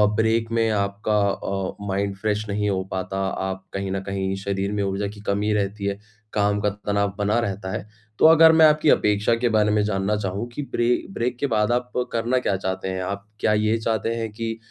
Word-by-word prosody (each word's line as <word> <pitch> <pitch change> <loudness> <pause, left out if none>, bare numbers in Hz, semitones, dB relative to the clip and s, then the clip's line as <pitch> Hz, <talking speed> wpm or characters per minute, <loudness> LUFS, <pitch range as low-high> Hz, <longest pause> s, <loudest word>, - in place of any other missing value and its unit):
Break 115 +1 +1
में 115 -1 +2
आपका 105 0 0
अ, 95 -1 -3
mind 100 +1 -1
fresh 105 +1 -1
नहीं 105 +1 0
हो 95 -1 0
पाता, 95 +1 -3
आप 95 0 -3
कहीं 95 0 -3
न 95 - -1
कहीं 95 0 -1
शरीर 100 0 -1
में 105 -1 -1
ऊर्जा 100 +1 -1
की 105 0 -10
कमी 105 +1 +1
रहती 100 0 -1
है, 100 0 -2 0.3
काम 105 0 +2
का 105 - +2
तनाव 100 0 -1
बना 105 +3 +1
रहता 100 -4 -3
है। 95 - -4 0.3
तो - - +5
अगर 160 0 +8
मैं 160 0 +7
आपकी 150 0 +4
अपेक्षा 105 0 +3
के 120 +1 0
बारे 105 -1 +3
में 105 0 +3
जानना 100 0 0
चाहूँ 100 +2 -3
कि 120 +5 -5
ब्रे 120 - +1 0.2
ब्रेक 125 -7 -2
के 140 - +1
बाद 110 -3 +1
आप 125 0 -1 0.2
करना 120 +2 0
क्या 100 - 0
चाहते 95 0 -3
हैं? 95 0 -3
आप 100 +2 -5
क्या 105 - +2
ये 110 +1 +2
चाहते 110 -1 -1
हैं 115 -2 -3
कि 115 +1 -4
105 Hz, 210 wpm, -23 LUFS, 100-115 Hz, 0.3 s, अगर